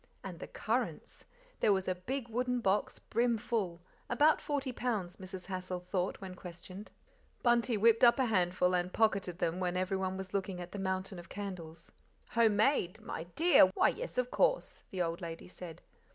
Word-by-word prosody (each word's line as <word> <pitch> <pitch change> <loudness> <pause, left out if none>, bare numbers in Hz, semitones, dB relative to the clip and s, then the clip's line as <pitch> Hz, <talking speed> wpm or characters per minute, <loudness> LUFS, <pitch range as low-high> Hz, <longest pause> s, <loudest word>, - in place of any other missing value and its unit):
And - - -7
the - - -7
currants! - - -3 0.3
There 210 - +4
was 190 -1 +1
a 185 - +2
big 240 +8 -4
wooden 250 +2 0
box 200 -2 +1
brim 235 +1 +1
full 190 -7 -2 0.3
about 305 +1 +4
forty 285 -3 -2
pounds, 215 -8 -2
Mrs. 185 -1 -8
Hassal 185 -1 -4
thought 180 +1 -2
when 190 -1 -7
questioned. 185 +3 -9 0.5
Bunty 240 -1 +3
whipped 230 +2 +4
up 240 +1 +8
a 260 - +3
handful 180 -4 +2
and 180 0 0
pocketed 195 -5 +1
them 170 0 -1
when 180 -1 -1
everyone 190 0 -1
was 190 -1 -7
looking 190 -2 -2
at 175 0 -7
the 205 - -5
mountain 190 0 -2
of 175 - -12
candles. 170 -5 -7 0.4
"Home 225 -2 +4
made! 210 -5 +2
my 160 - -6
DEAR, 335 - +7
why, - - +5
yes, - - -5
of 250 0 0
course," - - +1
the 185 -2 -1
old 170 +2 -3
lady 165 0 -6
said. 180 -3 -9
190 Hz, 180 wpm, -33 LUFS, 180-230 Hz, 0.5 s, up